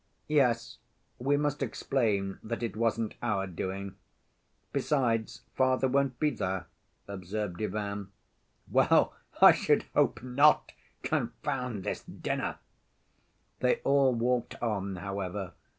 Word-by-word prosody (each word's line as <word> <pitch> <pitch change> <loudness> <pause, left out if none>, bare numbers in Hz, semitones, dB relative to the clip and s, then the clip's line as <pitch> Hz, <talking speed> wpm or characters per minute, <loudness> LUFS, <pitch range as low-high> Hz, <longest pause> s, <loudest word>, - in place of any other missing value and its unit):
"Yes, 120 -6 +2 0.4
we 140 +3 +2
must 145 0 -1
explain 110 -6 0
that 115 +2 -4
it 115 -4 -3
wasn't 115 0 0
our 95 -2 0
doing. 95 +2 -5 0.8
Besides, 120 -6 0
father 130 0 +2
won't 135 -1 +1
be 150 -1 +2
there," 95 -7 -2 0.4
observed 100 -1 -4
Ivan. 100 -1 -3 0.6
"Well, - - +4 0.3
I - - +11
should - - +2
hope - - +2
not! 140 +4 +4 0.3
Confound 120 -6 -2
this 105 - -3
dinner!" - - -3 1.0
They 125 - +3
all 135 -2 +4
walked 120 +1 0
on, 100 -4 -2
however. 95 0 -4
115 Hz, 110 wpm, -30 LUFS, 100-130 Hz, 1.0 s, I